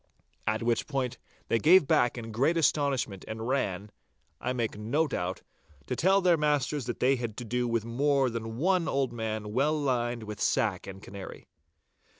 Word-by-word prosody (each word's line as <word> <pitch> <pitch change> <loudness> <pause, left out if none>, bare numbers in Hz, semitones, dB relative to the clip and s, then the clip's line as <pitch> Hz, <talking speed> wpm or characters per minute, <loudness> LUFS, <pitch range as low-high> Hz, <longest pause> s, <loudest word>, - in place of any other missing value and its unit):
At 110 +2 0
which 115 0 +1 0.6
they 115 - +2
gave 170 - +6
back 120 -2 +3
in 115 -1 -6
great 140 +10 +2
astonishment 140 - +1
and 110 +1 -5
ran, 105 -7 -1 0.5
I 125 - -2
make 120 -3 -2
no 120 +10 0
doubt, 90 - -3 0.4
to 125 - -2
tell 190 +8 +3
their 180 -2 +4
masters 150 -3 0
that 120 - -4
they 130 +2 +3
had 115 -3 -5
to 120 - -5
do 125 +2 -1
with 115 -2 0
more 135 +3 +2
than 115 0 -5
one 180 +3 +2
old 135 -3 0
man 110 -2 -4
well 150 +5 +2
lined 120 -4 -1
with 105 -1 -7
sack 110 -8 +1
and 95 0 -9
canary. 100 -1 -9
120 Hz, 170 wpm, -29 LUFS, 110-140 Hz, 0.6 s, gave